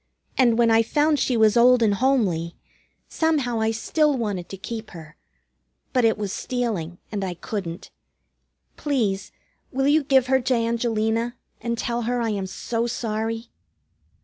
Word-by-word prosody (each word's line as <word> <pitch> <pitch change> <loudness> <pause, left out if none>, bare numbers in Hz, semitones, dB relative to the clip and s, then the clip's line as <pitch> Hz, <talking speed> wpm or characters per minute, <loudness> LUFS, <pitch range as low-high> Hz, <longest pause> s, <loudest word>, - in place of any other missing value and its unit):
And 240 -3 +4
when 235 -1 +4
I 225 0 +6
found 295 +5 +2
she 250 - +1
was 220 0 +4
old 245 0 +6
and 210 -2 +3
homely, 200 -9 +1 0.5
somehow 285 -8 0
I 220 0 +1
still 290 +6 +1
wanted 205 -7 -3
to 195 - -7
keep 220 +3 -6
her. 160 -3 -12 0.8
But 250 -3 +3
it 225 - +3
was 205 -2 -3
stealing, 215 -10 -3
and 205 -2 -2
I 180 -2 -3
couldn't. 175 -2 -6 0.9
Please, 220 -10 -1 0.4
will 270 +1 0
you 300 +1 +4
give 265 -2 +4
her 265 0 +2
to 255 +1 +1
Angelina, 230 0 0 0.3
and 235 0 -2
tell 235 +1 -2
her 245 0 0
I 230 -1 0
am 195 -2 -2
so 230 +4 -2
sorry?" 225 0 -3
230 Hz, 155 wpm, -24 LUFS, 210-250 Hz, 0.9 s, I